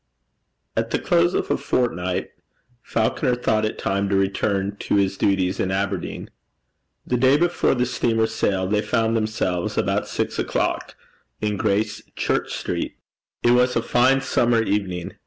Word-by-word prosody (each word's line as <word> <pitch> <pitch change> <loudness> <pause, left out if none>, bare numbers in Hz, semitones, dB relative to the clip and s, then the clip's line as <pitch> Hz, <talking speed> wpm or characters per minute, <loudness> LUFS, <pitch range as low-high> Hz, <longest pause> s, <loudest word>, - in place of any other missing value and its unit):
At - - 0
the - - +1
close 85 +1 +2
of - - -1
a - - +2
fortnight, 90 -7 -1 0.5
Falconer 115 +2 0
thought 110 -3 +1
it 110 - -3
time 100 0 -1
to 100 - +1
return 95 +1 0
to - - -1
his 95 -1 +2
duties 95 -2 +1
in 95 - 0
Aberdeen. 95 -1 -3 0.7
The 125 - 0
day 130 +3 +5
before 175 -3 +2
the 125 0 +1
steamer 115 -2 +1
sailed, 100 -4 -1
they 105 0 +2
found 115 0 +1
themselves, 110 -5 -1
about - - 0
six - - -2
o'clock, - - -1 0.4
in 105 -1 -1
Gracechurch 105 +1 -1
Street. - - -3 0.5
It 120 - +5
was 125 +1 +3
a 115 - +1
fine 130 +2 +3
summer 120 -3 +2
evening. 95 -5 -2
105 Hz, 150 wpm, -23 LUFS, 95-120 Hz, 0.7 s, day